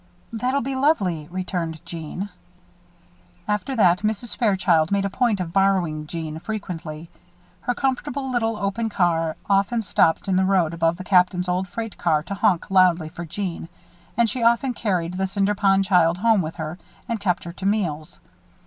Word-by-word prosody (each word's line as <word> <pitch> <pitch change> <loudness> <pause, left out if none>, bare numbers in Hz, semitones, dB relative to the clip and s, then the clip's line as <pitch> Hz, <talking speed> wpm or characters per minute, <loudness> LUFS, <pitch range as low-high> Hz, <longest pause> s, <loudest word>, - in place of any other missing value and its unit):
"That'll 255 +5 0
be 270 +3 -3
lovely," 200 - +1
returned 175 -3 -3
Jeanne. 170 +4 -6 1.2
After 210 +6 -1
that, 180 -6 +4
Mrs. 215 +2 -2
Fairchild 185 -7 +2
made 200 0 +1
a 200 - -2
point 230 -3 +1
of 170 -2 -4
borrowing 180 -6 +1
Jeanne 160 -1 -5
frequently. 170 -6 -6 0.5
Her 245 - -2
comfortable 265 +1 -2
little 225 -3 0
open 210 +3 -1
car 165 -5 +1
often 200 +4 +2
stopped 165 -2 +2
in 190 -1 +2
the 190 - +3
road 185 -4 +2
above 165 0 +1
the 185 - -7
Captain's 180 -1 +3
old 180 +1 0
freight 225 +4 -6
car 155 -3 +2
to 190 - -5
honk 190 -2 +1
loudly 180 -4 +4
for 170 +2 -7
Jeanne, 175 -1 -5 0.5
and 235 -1 +4
she 240 +3 -2
often 235 +3 +3
carried 180 -6 -1
the 190 0 0
Cinder 200 +1 +1
Pond 195 -1 +3
child 175 -2 +3
home 220 0 +3
with 160 -1 -5
her, 160 +3 -5 0.3
and 230 -1 -2
kept 190 -3 0
her 170 - -7
to 190 - -7
meals. 165 -8 -1
190 Hz, 170 wpm, -23 LUFS, 170-215 Hz, 1.2 s, that